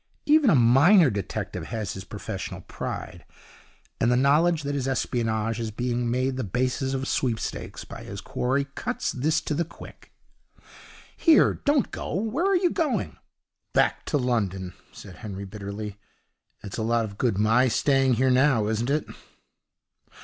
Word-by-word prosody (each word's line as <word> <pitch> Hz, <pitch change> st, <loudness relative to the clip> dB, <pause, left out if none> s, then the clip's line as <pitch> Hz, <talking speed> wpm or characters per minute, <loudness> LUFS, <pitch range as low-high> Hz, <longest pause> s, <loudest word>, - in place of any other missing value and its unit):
Even 300 Hz, -3 st, +5 dB
a 165 Hz, -, +5 dB
minor 140 Hz, -, +6 dB
detective 100 Hz, -2 st, -4 dB
has 110 Hz, -5 st, -4 dB
his 95 Hz, 0 st, -8 dB
professional 105 Hz, -2 st, -6 dB
pride; -, -, -6 dB, 0.8 s
and 120 Hz, -, +2 dB
the 125 Hz, -, +3 dB
knowledge 150 Hz, +5 st, +3 dB
that 145 Hz, 0 st, -2 dB
his 135 Hz, -2 st, -2 dB
espionage 115 Hz, -4 st, -1 dB
is 115 Hz, -1 st, -2 dB
being 120 Hz, +2 st, -2 dB
made 130 Hz, +2 st, 0 dB
the 130 Hz, -, -2 dB
basis 130 Hz, +5 st, -1 dB
of 135 Hz, 0 st, -3 dB
sweepstakes 120 Hz, -4 st, -2 dB
by -, -, -9 dB
his -, -, -7 dB
quarry 135 Hz, +3 st, -1 dB
cuts -, -, -2 dB
this 155 Hz, +5 st, +1 dB
to 155 Hz, -, -3 dB
the 165 Hz, +3 st, +1 dB
quick. 165 Hz, -, -13 dB, 1.0 s
'Here, 320 Hz, -2 st, +5 dB
don't 285 Hz, -5 st, +2 dB
go! -, -, -5 dB
Where 225 Hz, -, -1 dB
are 395 Hz, -1 st, +4 dB
you 355 Hz, -1 st, +2 dB
going?' 315 Hz, -7 st, -1 dB, 0.6 s
'Back -, -, +2 dB
to 150 Hz, -, 0 dB
London,' 100 Hz, -8 st, -1 dB, 0.2 s
said 95 Hz, -, -12 dB
Henry, 100 Hz, -2 st, -7 dB
bitterly. 105 Hz, +1 st, -7 dB, 0.6 s
'It's 100 Hz, +2 st, -6 dB
a -, -, -1 dB
lot 115 Hz, +1 st, +1 dB
of 100 Hz, -1 st, -10 dB
good 120 Hz, -7 st, +1 dB
my 115 Hz, +5 st, +4 dB
staying 135 Hz, +1 st, +2 dB
here 130 Hz, +2 st, +2 dB
now, 130 Hz, -4 st, +3 dB
isn't 110 Hz, +3 st, -1 dB
it?' 150 Hz, +1 st, +1 dB
125 Hz, 155 wpm, -25 LUFS, 110-145 Hz, 1.0 s, minor